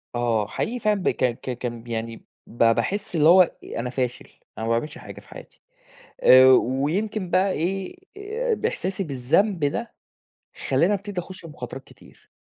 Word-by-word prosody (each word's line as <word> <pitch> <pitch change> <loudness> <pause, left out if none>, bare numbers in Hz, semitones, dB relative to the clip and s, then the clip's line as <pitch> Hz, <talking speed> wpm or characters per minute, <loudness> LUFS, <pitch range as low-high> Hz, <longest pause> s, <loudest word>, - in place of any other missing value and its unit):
آه 115 -3 0
حقيقي 240 - -3
فعلًا 210 -3 +1
ب - - +3
ك - - -3 0.2
ك 125 -2 -5
كان 120 -2 -5
يعني، 115 0 -4 0.3
ب 120 - -1
باحِس 195 - +1
اللي 155 0 +5
هو 185 +2 +8
أ 175 - -2
أنا 125 +1 -3
فاشل 125 -1 -3 0.3
أنا 110 - -4
ما 115 - -1
باعملش 150 +8 -2
حاجة - - -10
في - - -20
حياتي، - - -13 0.6
آآ 130 0 +8
ويمكن 165 - +1
بقى 185 +1 +2
إيه 190 - -3 0.2
آآ 445 +4 -2
بإحساسي 420 - -3
بالذنب 155 - +1
ده، 230 +11 -2 0.7
خلاني 185 +5 +2
أبتدي 200 -1 -4
أخش 185 -1 -11
مخاطرات 135 -3 -8
كتير. - - -20
165 Hz, 165 wpm, -24 LUFS, 125-205 Hz, 0.7 s, هو